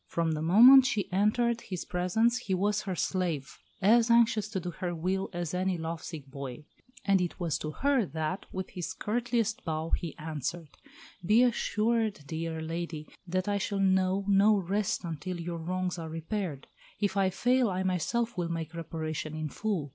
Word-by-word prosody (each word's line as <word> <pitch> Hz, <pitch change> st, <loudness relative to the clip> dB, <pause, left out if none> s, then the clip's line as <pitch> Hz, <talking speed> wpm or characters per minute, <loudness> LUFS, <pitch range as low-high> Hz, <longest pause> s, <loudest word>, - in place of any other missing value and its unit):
From 165 Hz, -1 st, 0 dB
the 155 Hz, -1 st, -2 dB
moment 245 Hz, +11 st, +8 dB
she 205 Hz, -6 st, -1 dB
entered 235 Hz, +4 st, +2 dB
his 185 Hz, -3 st, -5 dB
presence 220 Hz, +7 st, +1 dB
he 195 Hz, -6 st, -1 dB
was 205 Hz, +3 st, +1 dB
her 190 Hz, -3 st, -3 dB
slave, 170 Hz, -6 st, -2 dB, 0.2 s
as 230 Hz, +3 st, +5 dB
anxious 230 Hz, -3 st, +4 dB
to 205 Hz, -3 st, -2 dB
do 175 Hz, 0 st, -5 dB
her 175 Hz, 0 st, -4 dB
will 185 Hz, +4 st, -1 dB
as 175 Hz, -3 st, -4 dB
any 185 Hz, 0 st, 0 dB
lovesick 160 Hz, -2 st, -5 dB
boy. 140 Hz, 0 st, -8 dB, 0.4 s
And 195 Hz, -2 st, +4 dB
it 175 Hz, -, -3 dB
was 170 Hz, -4 st, -1 dB
to 155 Hz, -, -4 dB
her 265 Hz, -, +1 dB
that, 160 Hz, +4 st, -3 dB
with 190 Hz, 0 st, -5 dB
his 180 Hz, -2 st, -4 dB
courtliest 230 Hz, 0 st, -1 dB
bow, 160 Hz, 0 st, -3 dB
he 165 Hz, -4 st, -2 dB
answered, 155 Hz, +1 st, -4 dB, 0.5 s
"Be 215 Hz, +7 st, +5 dB
assured, 225 Hz, -4 st, +1 dB
dear 160 Hz, +1 st, -4 dB
lady, 165 Hz, -1 st, -5 dB, 0.2 s
that 185 Hz, +2 st, -1 dB
I 205 Hz, 0 st, +1 dB
shall 200 Hz, 0 st, -2 dB
know 190 Hz, 0 st, +2 dB
no 205 Hz, +2 st, +5 dB
rest 195 Hz, +2 st, -1 dB
until 170 Hz, +2 st, -4 dB
your 170 Hz, 0 st, -4 dB
wrongs 180 Hz, +1 st, -2 dB
are 165 Hz, -1 st, -5 dB
repaired. 165 Hz, -2 st, -4 dB, 0.3 s
If 205 Hz, -2 st, 0 dB
I 195 Hz, -1 st, +3 dB
fail, 245 Hz, +5 st, +2 dB
I 185 Hz, 0 st, -1 dB
myself 220 Hz, +6 st, 0 dB
will 175 Hz, -3 st, -2 dB
make 165 Hz, -1 st, -4 dB
reparation 160 Hz, -2 st, -4 dB
in 155 Hz, -1 st, -3 dB
full. 195 Hz, -6 st, -2 dB
185 Hz, 175 wpm, -29 LUFS, 165-210 Hz, 0.5 s, moment